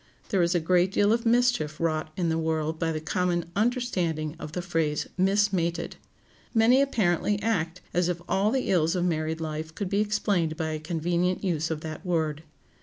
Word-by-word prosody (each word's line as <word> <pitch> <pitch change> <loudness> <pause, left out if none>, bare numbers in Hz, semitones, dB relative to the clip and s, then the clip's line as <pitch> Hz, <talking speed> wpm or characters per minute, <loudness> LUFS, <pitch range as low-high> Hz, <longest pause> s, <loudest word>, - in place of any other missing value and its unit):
There 195 - +2
is 170 +1 +2
a - - +4
great 180 +3 +2
deal 205 +2 +3
of 230 0 0
mischief 235 -11 +2
wrought 155 -1 -1
in 175 -3 +1
the 160 - +1
world 160 0 -1
by 165 -1 0
the 155 - -2
common 175 +2 0
understanding 185 - 0
of 150 - -7
the 180 - -2
phrase 165 -4 -1
"mismated." 190 -3 +1 0.6
Many 235 +4 +5
apparently 205 -6 +1
act 180 -6 -1
as 175 0 +2
if 175 -1 -2
all 195 +2 +2
the 260 -1 0
ills 165 -1 +2
of 180 -1 0
married 160 -1 -1
life 160 0 -5
could 200 -3 -3
be 200 +1 +2
explained 200 -6 0
by 160 -2 -2
a 155 0 -3
convenient 175 +3 -1
use 165 -4 0
of 160 -2 -3
that 155 -1 -7
word. 160 -4 -1
175 Hz, 185 wpm, -27 LUFS, 160-200 Hz, 0.6 s, Many